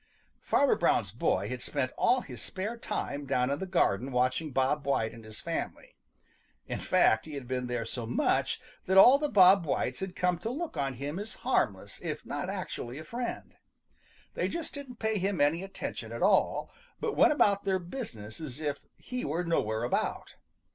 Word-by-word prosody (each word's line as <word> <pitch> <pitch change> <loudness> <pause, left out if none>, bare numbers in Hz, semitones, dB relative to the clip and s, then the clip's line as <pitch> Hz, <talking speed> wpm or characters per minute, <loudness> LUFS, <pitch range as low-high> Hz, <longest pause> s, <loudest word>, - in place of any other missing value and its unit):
Farmer - - +3
Brown's - - +2
boy 95 +2 0
had 125 -1 -4
spent 130 -2 -1
all 255 0 +3
his 125 - -8
spare 205 +5 -3
time 145 -10 -4
down 125 +1 +1
in 140 - -1
the 190 - -4
garden 135 - +1
watching 130 +5 +1
Bob 135 +3 +1
White 115 -5 +1
and 115 - -11
his 110 0 -10
family. - - -5 0.7
In - - -4
fact, 110 +4 +3
he 155 - -7
had 135 -3 -6
been 125 0 -2
there 120 -2 -2
so 120 -3 -5
much 120 - +1 0.3
that 190 +1 +3
all 250 +8 +9
the 295 -1 0
Bob 190 -3 +7
Whites 150 - -1
had 190 -1 -5
come 180 -2 +1
to 220 - -3
look 305 - -4
on 135 -3 -1
him 145 +7 -4
as 210 +2 -5
harmless 105 - 0
if - - -4
not - - -3
actually 120 +2 -5
a 155 - -7
friend. 235 +8 -5 0.8
They - - 0
just 335 -1 -4
didn't 280 -4 -7
pay 220 -2 0
him 195 0 -1
any 150 +4 +3
attention 195 0 -6
at - - -3
all, - - +3 0.3
but - - -2
went - - +6
about 200 -8 +3
their 190 -1 +1
business 170 - -7
as 145 -3 -6
if 145 -2 -2 0.2
he 250 0 -5
were 165 +5 -1
nowhere 110 -10 0
about. 120 - -1
155 Hz, 190 wpm, -30 LUFS, 125-200 Hz, 0.8 s, all